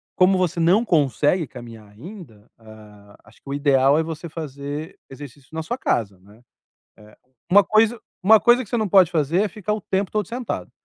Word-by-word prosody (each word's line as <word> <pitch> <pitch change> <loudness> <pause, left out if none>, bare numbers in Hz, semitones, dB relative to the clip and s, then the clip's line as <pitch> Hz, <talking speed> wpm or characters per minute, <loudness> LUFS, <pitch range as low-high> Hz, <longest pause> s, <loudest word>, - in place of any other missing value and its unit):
como 185 +1 +3
você 180 -2 -1
não 190 +8 +3
consegue 155 - +1
caminhar 115 -4 -12
ainda, 120 - -13
hã, 105 -2 -16
acho - - -22
que 140 - -14
o - - -3
ideal 140 0 +3
é - - 0
você 165 +1 -7
fazer 145 0 -7
exercício 135 0 -13
na 160 - -4
sua 240 +9 -4
casa, 100 - -2
né. 105 +5 -20 1.1
Uma 205 +1 +6
coisa 220 +3 +2 0.2
uma 215 +2 +6
coisa 240 +2 +3
que - - -20
você 240 - -1
não 215 -3 -1
pode 185 -3 +5
fazer 165 +4 +1
é 210 - -1
ficar 210 +2 -5
o 215 - -5
tempo 190 0 -2
todo 210 -4 -2
sentado. 245 0 -5
160 Hz, 190 wpm, -21 LUFS, 130-200 Hz, 1.1 s, Uma